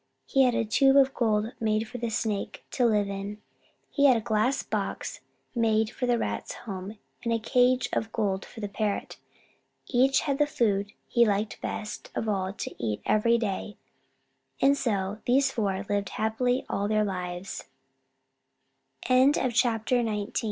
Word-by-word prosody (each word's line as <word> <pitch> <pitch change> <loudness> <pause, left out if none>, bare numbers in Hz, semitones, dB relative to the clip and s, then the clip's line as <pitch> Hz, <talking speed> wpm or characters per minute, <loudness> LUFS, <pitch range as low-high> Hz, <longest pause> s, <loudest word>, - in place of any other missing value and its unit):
He 270 - +2
had 245 -2 +2
a 230 - +1
tube 270 +5 +4
of 270 -1 +5
gold 220 -1 +1
made 220 0 0
for 245 +2 -7
the 235 0 -2
Snake 215 -2 -3
to 245 -2 +2
live 210 -3 +2
in. 200 +1 -5 0.5
He 285 - +3
had 260 -4 +6
a - - 0
glass 220 +4 +1
box - - -3 0.3
made 220 -2 +2
for 250 - -3
the 240 -1 +3
Rat's 105 - -3
home, 195 0 -6 0.3
and 235 - -1
a 230 - +3
cage 250 +2 +2
of 220 - -1
gold 195 -4 -1
for 225 - -11
the 205 - -2
Parrot. 205 0 -2 0.7
Each 265 +2 +3
had 280 0 -1
the 295 - +4
food 205 -7 0
he 235 - +4
liked 210 -1 0
best 210 - -5
of 225 - -2
all 190 -3 0
to - - -6
eat 105 -2 -2
every 230 +2 +3
day, 210 -2 -3 0.8
and 275 +1 +5
so 205 -5 -1
these 270 +2 +3
four 200 -5 -1
lived 205 -2 -1
happily 245 +4 0
all 200 +1 -1
their 215 0 +2
lives. 180 -1 -5 1.4
XX 260 +3 +5 0.5
BEAU 220 -5 0
220 Hz, 160 wpm, -27 LUFS, 205-245 Hz, 1.4 s, had